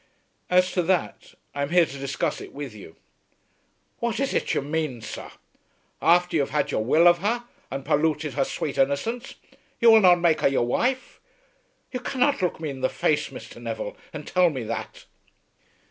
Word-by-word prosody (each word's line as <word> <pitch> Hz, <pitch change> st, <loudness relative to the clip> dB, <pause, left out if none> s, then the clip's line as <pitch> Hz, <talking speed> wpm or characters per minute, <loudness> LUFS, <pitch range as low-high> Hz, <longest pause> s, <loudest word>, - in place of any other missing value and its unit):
"As 180 Hz, 0 st, +3 dB
to 180 Hz, -, +1 dB
that, 180 Hz, +1 st, -1 dB, 0.2 s
I 140 Hz, -, -3 dB
am 140 Hz, -, -1 dB
here 175 Hz, 0 st, +5 dB
to 140 Hz, -, -9 dB
discuss 140 Hz, 0 st, -2 dB
it -, -, -10 dB
with 140 Hz, -4 st, -6 dB
you." 100 Hz, -6 st, -12 dB, 1.0 s
"What 235 Hz, 0 st, -1 dB
is 275 Hz, 0 st, 0 dB
it -, -, 0 dB
you -, -, 0 dB
main, 150 Hz, -4 st, -2 dB
sir? -, -, -7 dB, 0.7 s
Afther 175 Hz, +1 st, +3 dB
you -, -, +3 dB
have 135 Hz, -, -2 dB
had 145 Hz, +1 st, 0 dB
your 110 Hz, -, 0 dB
will 160 Hz, +9 st, +5 dB
of 175 Hz, 0 st, +5 dB
her, 230 Hz, +6 st, -1 dB, 0.3 s
and 135 Hz, 0 st, -5 dB
polluted 155 Hz, -1 st, +1 dB
her 135 Hz, +1 st, +1 dB
sweet 140 Hz, +1 st, -4 dB
innocence, 140 Hz, -, -1 dB, 0.4 s
you 235 Hz, -1 st, +7 dB
will 220 Hz, -1 st, +7 dB
not 180 Hz, -2 st, +6 dB
make 170 Hz, -2 st, +2 dB
her -, -, +4 dB
your 135 Hz, -3 st, +1 dB
wife! 255 Hz, -, -1 dB, 0.7 s
You 250 Hz, -, -3 dB
cannot 260 Hz, +1 st, 0 dB
look 180 Hz, -3 st, -1 dB
me 155 Hz, -3 st, -3 dB
in 135 Hz, -1 st, -8 dB
the 130 Hz, -, +2 dB
face, 150 Hz, -, 0 dB
Mr. -, -, -11 dB
Neville, -, -, -5 dB, 0.2 s
and -, -, -7 dB
tell 180 Hz, -1 st, +3 dB
me 130 Hz, -6 st, -4 dB
that." 115 Hz, +1 st, -6 dB
160 Hz, 190 wpm, -25 LUFS, 140-190 Hz, 1.0 s, you